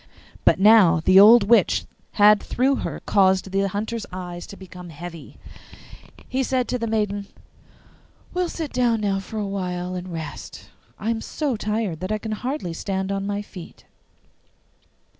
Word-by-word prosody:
But - - +4
now 195 -5 +6
the 185 +3 +6
old 220 +2 +8
witch 230 +4 +3 0.3
had 210 0 +5
through 265 +2 0
her - - -5
caused 190 -1 +2
the 195 +1 +1
Hunter's 215 +3 -4
eyes 175 -1 -7
to 200 - -11
become 180 -2 -11
heavy. 165 +1 -10 0.9
He 260 - -1
said 255 -1 0
to 250 - -1
the 230 - -2
maiden, 205 -2 -1 1.1
'We 360 - -1
will 355 - -1
sit 320 -4 -5
down 240 -3 +1 0.2
for 205 +3 -8
a - - -1
little 200 -1 -4
while 180 -2 -3
and 180 0 -6
rest; 160 -4 -8 0.3
I 220 +2 -2
am 225 -1 -3
so 285 -1 -2
tired 210 -5 -2
that 185 +4 -4
I 215 - 0
can 220 +1 -6
hardly 245 - -4
stand 190 +2 -3
on 195 0 -2
my 205 0 -3
feet. 180 -4 -12
200 Hz, 165 wpm, -23 LUFS, 185-225 Hz, 1.1 s, old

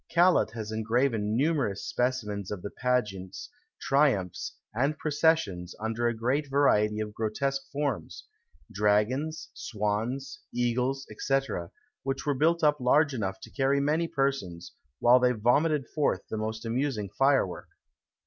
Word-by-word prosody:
Callot 175 +1 +4
has 110 -2 -5
engraven 110 -1 0
numerous 135 -9 0
specimens 110 -6 -2
of 100 -4 -5
the 100 - -5
pageants, 105 - -2 0.3
triumphs, 135 - +1 0.2
and 140 +7 0
processions, 145 - +1
under 115 +2 -1
a 120 - 0
great 135 +6 0
variety 105 -7 +3
of 105 -1 -4
grotesque 135 +6 -1
forms: 145 -1 -3 0.5
dragons, 110 +10 +1
swans, 115 +6 -3
eagles, 125 +3 0
&c., 135 0 +2 0.6
which 135 0 -3
were 145 - +2
built 165 +5 +2
up 150 -1 +4
large 145 +4 +3
enough 95 -5 -3
to - - -11
carry 140 0 +1
many 155 +4 +1
persons, 135 - -2 0.2
while 125 +2 +6
they 125 0 +3
vomited 135 +5 +2
forth 150 -2 0
the - - -1
most 110 +1 -4
amusing 115 -3 -1
firework. 135 -4 +1
125 Hz, 130 wpm, -28 LUFS, 105-140 Hz, 0.6 s, while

